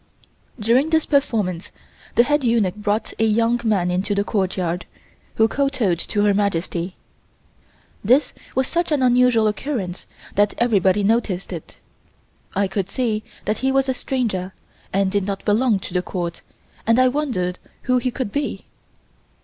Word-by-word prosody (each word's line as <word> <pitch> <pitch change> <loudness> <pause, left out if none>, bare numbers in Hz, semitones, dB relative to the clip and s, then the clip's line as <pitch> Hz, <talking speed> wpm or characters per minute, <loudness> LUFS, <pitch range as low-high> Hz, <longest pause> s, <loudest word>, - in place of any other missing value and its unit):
During 240 +8 +3
this 320 -1 +2
performance 215 - 0 0.4
the 235 - +6
head 295 +2 +1
eunuch 230 -6 +2
brought 210 +1 -1
a - - +3
young 230 +2 +2
man 195 -6 +1
into 190 +3 0
the 200 - +1
courtyard, 185 -4 -1 0.5
who 220 - +4
kowtowed 255 -10 0
to 205 +3 -1
Her 205 -1 +4
Majesty. 185 -2 -1 1.1
This 255 +8 +3 0.2
was 265 +1 +2
such 345 -1 -1
an 285 -3 +2
unusual 250 -2 +4
occurrence 210 -5 -3 0.3
that 205 +1 +2
everybody 205 -4 +3
noticed 200 -4 0
it. 165 - -9 0.8
I 200 +1 +2
could 190 0 -3
see 220 -3 -1 0.2
that 215 - -1
he 265 0 +1
was 270 0 +2
a 260 - +1
stranger 215 -9 -2 0.4
and 195 0 +1
did 200 -1 0
not 195 -1 -4
belong 220 +1 +3
to - - -8
the 180 - +1
Court 175 -2 -4 0.5
and 230 +1 +4
I 255 0 +5
wondered 250 -11 -1 0.2
who 255 0 +2
he 255 - -1
could 245 -3 -4
be. 285 +4 -3
215 Hz, 155 wpm, -21 LUFS, 190-250 Hz, 1.1 s, the